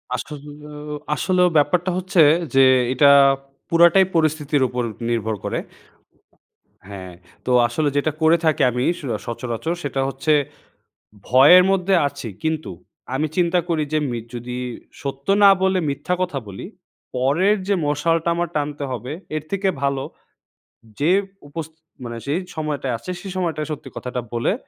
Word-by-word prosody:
আসলেও 150 +2 -8 0.2
আসলেও 180 -1 +2
ব্যাপারটা 175 +5 +2
হচ্ছে 185 -1 +2 0.3
যে 135 - +7 0.3
এটা 140 +2 +5 0.6
পুরাটাই 170 +3 +6
পরিস্থিতির 155 -2 +1
ওপর 125 0 -3 0.3
নির্ভর 110 -2 -1
করে। - - -2 1.3
হ্যাঁ। 95 -3 -9 0.3
তো 125 - -1 0.2
আসলে 145 +6 0
যেটা 155 +2 +1
করে 160 +2 +5
থাকি 155 -2 +2
আমি 125 +1 -2 0.2
স - - -11 0.2
সচরাচর 120 +6 -3
সেটা 140 -1 -2
হচ্ছে, 135 +3 0 0.9
ভয়ের 145 +9 +7
মধ্যে 195 0 +1
আছি 140 -4 -7 0.2
কিন্তু 160 -5 -2 0.4
আমি 155 +3 0
চিন্তা 175 0 +3
করি 160 -2 +1
যে 155 - +3
মি 120 - -3 0.2
যদি 120 +1 -5 0.4
সত্য 140 0 -6 0.2
না 200 - +9
বলে 190 0 +2
মিথ্যা 140 +6 -2
কথা 175 -7 -1
বলি। 95 -1 -8 0.5
পরের 155 +12 +2
যে 200 - +2
মশালটা 160 +3 +1
আমার 175 0 -1
টানতে 145 -1 -2
হবে 125 +1 -5 0.2
এর 155 - -3
থেকে 195 0 0
ভালো, 140 -1 0 1.0
যে 150 +4 +3 0.4
উপস 160 +2 -5 0.4
মানে 120 -1 -6
যেই 150 +6 0 0.2
সময়টা 150 -3 -3
আছে 115 - -8
সেই 195 -2 -7
সময়টায় 165 -4 -2
সত্যি 150 - -6
কথাটা 125 0 -4
বলে 120 +9 0
150 Hz, 140 wpm, -21 LUFS, 135-170 Hz, 1.3 s, না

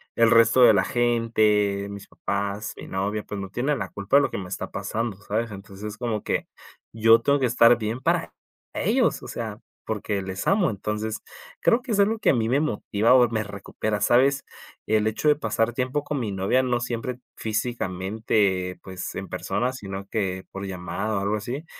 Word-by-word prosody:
el 115 -1 +5
resto 115 +2 +5
de 120 - +8
la - - +3
gente, 110 -4 +2
mis 100 -1 -8
papás, 100 +1 -3
mi - - -9
novia, 100 +3 -2
pues, 105 - -6
no 95 - -6
tiene 135 +8 0
la - - -4
culpa 100 +7 +2
de 145 - +6
lo - - +1
que - - -3
me 95 -2 -5
está 90 - -5
pasando, 115 -3 -3
¿sabes? 110 +3 -2
Entonces, 100 +1 -8
como 115 -4 -2
que - - -1 0.5
yo 115 +1 +6
tengo 140 0 +3
que 130 - +2
estar 115 0 +6
bien 110 +3 -2
para - - 0 0.4
ellos, - - +1
o - - -8
sea, - - -5 0.3
porque 100 -1 -2
les 95 0 -5
amo. 195 -5 +3
Entonces, 105 +1 -3 0.4
creo 235 - +4
que 245 -2 -3
es 205 - +1
algo 215 +2 +3
que - - +2
a - - +5
mí 110 -1 0
me 130 +4 +2
motiva 115 -5 +2
o 125 -2 +6
me 110 -2 -1
recupera, 105 +1 -4
¿sabes? 135 +5 +3 0.4
El 110 0 +2
hecho 110 +8 +1
de 150 - +5
pasar 120 -5 0
tiempo 130 +4 -1
con 145 -2 -3
mi 110 -4 -2
novia, 100 +7 +2
no 125 -2 0
siempre 120 +1 -3 0.2
físicamente, 105 -3 -1
pues 95 -1 -6
en - - -5
persona, 125 +4 -1
sino 100 -5 -6
que 95 -4 -2
por 95 +1 -6
llamada 95 +4 -3
o - - +1
algo 100 +2 0
así, 125 +9 -5
110 Hz, 195 wpm, -25 LUFS, 100-125 Hz, 0.5 s, de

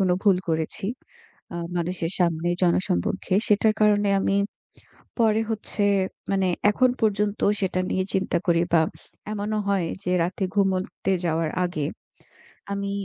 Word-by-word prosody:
কোন 185 -2 +2
ভুল 200 -3 +5
করেছি, 160 +6 -2 0.7
আ - - -4 0.2
মানুষের 170 -1 -2
সামনে, 170 -1 +1
জনসম্মুখে। 180 - +1
সেটার 215 +1 +4
কারণে 205 -1 +4
আমি 195 0 +1 0.8
পরে 220 -2 +3
হচ্ছে 215 -1 -3 0.5
মানে 195 -1 +1 0.2
এখন 255 +4 +3
পর্যন্ত 210 -1 +1 0.2
সেটা 185 -1 0
নিয়ে 185 - 0
চিন্তা 190 - +1
করি 170 -1 +3
বা 165 - +6 0.5
এমনও 215 +1 -2
হয় 195 -4 +1 0.2
যে 180 - -1
রাতে 180 +3 -2
ঘুমোতে 195 -1 0
যাওয়ার 160 -1 0
আগে 155 -5 -2 0.9
আমি 200 0 -2
190 Hz, 130 wpm, -24 LUFS, 175-205 Hz, 0.9 s, বা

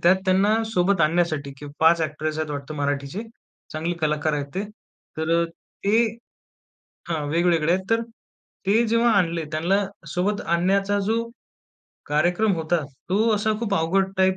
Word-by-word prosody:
त्यात 175 +2 +6
त्यांना 200 +4 +3
सोबत 200 -3 +1
आणण्यासाठी 155 -3 +1
की 145 - -9
5 165 +1 +5
ॲक्टर्स 155 0 -2
आहेत 155 -1 -2
वाटतं 145 +1 -5
मराठीचे, 145 +5 -2 0.5
चांगले 160 +3 -2
कलाकार 150 0 0
आहेत 145 -1 -2
ते. 190 - -1 0.5
तर 160 +1 -2
अ, - - +1
ते 205 +6 -1 1.0
हां, 160 -3 -2
वेगवेगळे 165 0 +2
आहेत, 190 +1 0
तर 225 0 +3 0.7
ते 220 +4 +3
जेव्हा 230 +1 +3
आणले, 170 -3 0
त्यांना 180 +6 +1 0.3
सोबत 200 +3 0
आणण्याचा 195 +4 +2
जो 225 +2 +1 0.8
कार्यक्रम 175 +8 +2
होता, 165 0 0 0.3
तो 210 +5 +2
असा 210 +1 +1
खूप 205 -4 0
अवघड 190 +3 +1
टाइप 190 0 +3
175 Hz, 145 wpm, -24 LUFS, 155-200 Hz, 1.0 s, त्यात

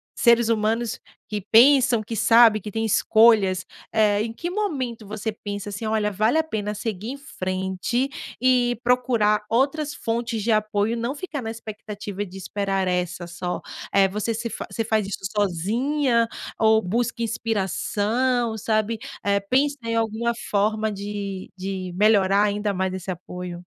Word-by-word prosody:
seres 235 -1 +4
humanos 225 +1 0 0.3
que 210 -1 -3
pensam, 240 -1 +6
que 225 +2 -5
sabem 225 0 +6
que 210 - -6
tem 225 +2 -1
escolhas, 215 -3 +4 0.3
eh. 210 -2 +3
Em 225 +1 -2
que 345 +9 -4
momento 265 - -3
você 215 +2 -3
pensa 205 -1 -6
assim: 205 +2 -5
"Olha, 215 -1 +1
vale 215 +9 +2
a 320 - +3
pena 210 -9 -3
seguir 210 -1 -4
em 275 - -6
frente 190 +1 -2 0.3
e 250 -1 +3
procurar 235 -4 +2
outras 285 +5 +1
fontes 230 -1 -2
de 230 - +1
apoio 215 0 +1
e - - -1
não 235 +4 -2
ficar 300 -3 -5
na 225 - -4
expectativa 210 -2 -6
de 190 0 -11
esperar 195 -1 -2
essa 180 -1 -1
só?" 175 +1 -4 0.3
Eh, 195 -1 +5
você 210 +4 -2
se 235 +1 -3
fa - - -6
você 225 - -1
faz 215 -2 0
isso 195 -1 -5
sozinha 230 - +1 0.3
ou 220 0 +5
busca 235 +5 -1
inspiração, 225 +2 0
sabe? 215 +1 0 0.2
Eh, 200 0 +2
pensa 270 +8 +1
em 230 0 -1
alguma 225 +1 0 0.2
forma 215 +1 +1
de 200 -1 -5
de 185 -1 -4
melhorar 200 -1 +4
ainda 205 0 0
mais 190 0 -1
esse 190 0 -6
apoio? 180 0 -6
215 Hz, 155 wpm, -24 LUFS, 200-235 Hz, 0.3 s, pensam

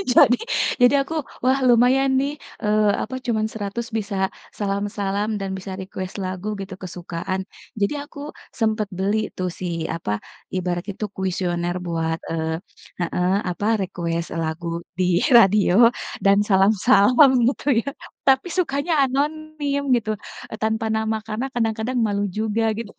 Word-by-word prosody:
Jadi 245 - +7 0.4
jadi 245 +3 +6
aku, 300 +4 -4 0.3
"Wah, 260 +1 +4
lumayan 255 +3 +4
nih, 280 +2 -1 0.3
eee, 210 0 +3
apa, 260 +4 -5
cuman 220 -3 +1
Rp100 220 +2 -4
bisa 205 -2 -3 0.4
salam-salam, 200 0 -1
dan 195 - -3
bisa 190 0 -7
request 185 -1 -6
lagu," 185 +3 -3
gitu, 190 0 -7
kesukaan. 180 0 -4 0.4
Jadi, 200 - +2
aku 290 -1 -12 0.3
sempet 220 -2 0
beli 200 +3 +1 0.2
tuh, 185 0 -1
si, 180 +1 -7 0.2
apa, 165 -10 -3 0.4
ibarat 180 -1 -2
itu 205 +2 -4
kuisioner 175 -2 -1
buat, 165 -1 -1
eee 160 0 -1 0.4
heeh, 180 +2 0 0.2
apa, 180 +4 -3 0.2
request 170 -2 -3
lagu 165 +1 -3 0.3
di 185 - +3 0.3
radio, 215 +1 +6 0.4
dan 195 0 +6
salam-salam, 210 +6 +5 0.2
gitu 275 - -6 0.2
ya. 280 - -4 0.4
Tapi, 265 +5 +4
sukanya 315 -1 0
anonim, 290 +1 -1 0.2
gitu, 215 -2 -2 0.4
eee, 220 - -5
tanpa 220 0 0
nama, 220 0 0
karena, 225 +5 -2
kadang-kadang, 225 +1 -1
malu 205 -1 0
juga, 220 +1 0
gitu. 230 -2 -6
210 Hz, 135 wpm, -22 LUFS, 185-240 Hz, 0.4 s, Jadi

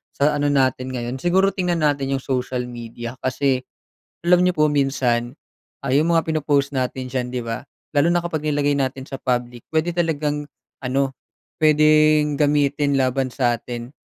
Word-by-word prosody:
sa 150 +1 +2
ano 145 - +1
natin 130 -2 +1
ngayon 125 +1 -4
siguro 190 +5 +3
tingnan 175 -4 -1
natin 140 -2 +1
'yong 135 - -5
social 125 -1 -2
media. 120 0 -7
Kasi, 130 0 0 0.7
alam 180 0 +5
niyo 180 - +4
po 150 0 +4
minsan 135 -4 0 0.5
ay 135 +3 +3
'yong 165 - 0
mga 165 -1 +3
pino-post 145 -3 0
natin 130 0 -2
diyan, 125 -1 -3
'di 125 -1 -2
ba, 115 +3 -4 0.3
lalo 145 +3 +4
na 175 - +3
kapag 160 -3 -3
nilagay 145 -1 +1
natin 130 -1 -2
sa - - -6
public 120 -2 -2
puwede 160 +2 0
talagang 150 -3 -1 0.4
ano, 135 +1 0 0.5
puwedeng 155 -1 +4
gamitin 145 -1 +2
laban 130 0 0
sa 120 -2 +1
atin. 120 +1 -7
140 Hz, 160 wpm, -22 LUFS, 130-150 Hz, 0.7 s, alam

